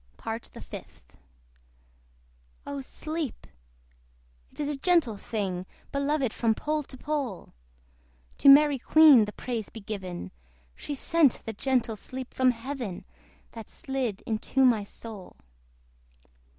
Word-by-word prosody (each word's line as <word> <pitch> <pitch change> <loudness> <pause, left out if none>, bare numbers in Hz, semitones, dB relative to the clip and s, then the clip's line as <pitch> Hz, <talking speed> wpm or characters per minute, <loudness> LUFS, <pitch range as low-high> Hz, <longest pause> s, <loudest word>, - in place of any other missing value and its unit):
PART 225 +1 -5
THE - - -10
FIFTH. - - -11 1.5
Oh 280 -1 -4
sleep! 310 +1 -5 1.1
it - - -15
is 295 0 -1
a 275 - -6
gentle 330 - +3
thing, 190 -4 -3 0.2
Beloved 280 -3 0
from 225 -1 +1
pole 305 +4 -1
to 265 -2 -11
pole! 275 - -3 0.9
To 280 - +7
Mary 285 0 +7
Queen 295 -5 +7
the 210 - -6
praise 235 -4 -4
be 225 - -9
given! 185 - -6 0.4
She 290 - -5
sent 305 -1 +2
the 225 - -4
gentle 245 0 0
sleep 255 +4 -7
from 260 -1 +4
Heaven, 245 -5 -4 0.5
That 225 -2 -10
slid 260 -7 -3
into 230 +4 +1
my 230 -5 +4
soul. 205 -1 -9
255 Hz, 125 wpm, -28 LUFS, 220-285 Hz, 1.5 s, To